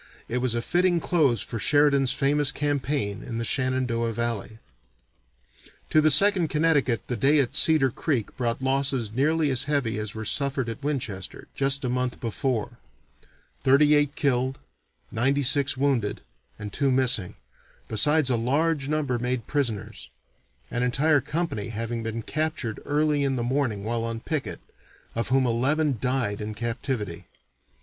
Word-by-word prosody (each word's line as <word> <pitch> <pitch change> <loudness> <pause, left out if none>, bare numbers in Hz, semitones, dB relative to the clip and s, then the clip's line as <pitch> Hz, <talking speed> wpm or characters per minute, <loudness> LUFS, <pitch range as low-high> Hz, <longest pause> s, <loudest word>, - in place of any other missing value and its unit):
It 125 - -2
was 125 -2 0
a 120 - -2
fitting 175 +2 +2
close 150 - +1
for 115 - -5
Sheridan's 140 0 +3
famous 140 +1 +2
campaign 145 -8 -2
in 115 -3 -6
the 115 - -2
Shenandoah 125 -3 -1
Valley. 115 -1 -3 1.3
To 155 - +5
the 155 - +4
Second 180 +3 +5
Connecticut 150 -6 +1
the 125 - -3
day 140 +7 +3
at 135 -4 +1
Cedar 155 -5 +5
Creek 135 -4 -2
brought 120 +1 -2
losses 135 -4 0
nearly 150 +5 +1
as 130 - +2
heavy 135 -7 -1
as 105 -1 -5
were 110 0 -5
suffered 140 -2 0
at 115 +3 -7
Winchester 120 -10 -4
just 135 0 +1
a - - 0
month 125 0 -2
before: 120 0 -3 0.8
thirty 145 +3 +5
eight 145 -1 +2
killed, 130 -1 0 0.5
ninety 135 +5 +1
six 140 0 +2
wounded, 130 -6 0 0.4
and 105 -1 -8
two 140 -1 +1
missing, 125 -7 +2 0.5
besides 140 +6 +3
a - - +3
large 140 +5 0
number 145 -5 -1
made 125 -1 -2
prisoners, 110 -7 -3 0.6
an 120 - -2
entire 140 +4 +2
company 150 -7 -3
having 115 +1 -4
been 115 0 -4
captured 155 -7 -3
early 150 0 +1
in 135 -1 0
the 120 - -2
morning 120 -5 -1
while 115 +1 -2
on 115 0 -4
picket, 150 +3 -4 0.5
of 115 - -2
whom 130 +1 +2
eleven 135 +3 +1
died 125 -5 -1
in 105 0 -5
captivity. 115 -5 -4
130 Hz, 150 wpm, -25 LUFS, 115-145 Hz, 1.3 s, To